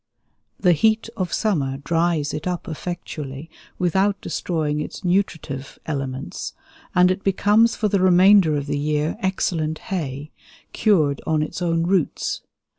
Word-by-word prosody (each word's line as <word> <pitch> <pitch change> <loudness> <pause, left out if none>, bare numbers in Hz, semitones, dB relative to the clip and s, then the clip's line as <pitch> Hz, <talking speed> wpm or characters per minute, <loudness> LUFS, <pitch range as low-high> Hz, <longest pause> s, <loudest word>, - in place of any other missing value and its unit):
The 180 - +4
heat 220 +6 +2
of 185 -5 -2
summer 145 - 0
dries 165 0 0
it 150 +3 -4
up 180 -1 -3
effectually 155 -3 -6 0.3
without 195 +3 +1
destroying 150 -3 -2
its 150 - -7
nutritive 165 -7 -1
elements, 135 -3 -4 0.4
and 180 0 +5
it 190 +1 -3
becomes 210 +4 +3
for 215 - 0
the 200 -1 +1
remainder 185 -2 +6
of 140 - -3
the 145 0 -2
year 150 +1 0
excellent 165 -4 -1 0.2
hay, 145 -4 -4 0.4
cured 155 -10 +2
on 155 -1 +2
its 155 - -6
own 165 -1 +1
roots. 180 -3 0
165 Hz, 135 wpm, -22 LUFS, 150-190 Hz, 0.4 s, remainder